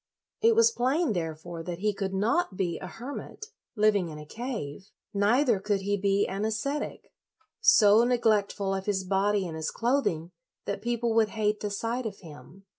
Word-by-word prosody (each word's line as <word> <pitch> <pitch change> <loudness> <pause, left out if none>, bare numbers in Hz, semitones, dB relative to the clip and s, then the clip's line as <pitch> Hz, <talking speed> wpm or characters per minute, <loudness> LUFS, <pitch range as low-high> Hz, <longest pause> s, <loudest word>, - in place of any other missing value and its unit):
It 460 0 +5
was 460 +1 +5
plain, 275 - +1
therefore, 165 -1 -4
that 170 +1 -5
he 210 +3 0
could 195 -1 -3
not 210 - 0
be 175 -3 -1
a 185 - -7
hermit, 260 - -8 0.3
living 210 -5 +2
in 155 - -8
a 150 - -9
cave; 210 - -6 0.2
neither 220 +3 +3
could 200 0 -1
he 205 +1 0
be 200 0 +2
an 195 +2 -3
ascetic, 220 +7 -3 0.5
so 210 +1 +6
neglect 225 -4 +2
ful 195 -1 -2
of 190 +1 -4
his 195 -2 0
body 195 +1 +1
and 165 -2 -5
his 160 0 -3
clothing 230 - 0 0.3
that 200 0 -3
people 235 0 -1
would 220 -1 +3
hate 210 -1 0
the 210 - -3
sight 230 +4 -2
of 200 - -7
him. 170 +3 -13
205 Hz, 180 wpm, -28 LUFS, 190-235 Hz, 0.5 s, so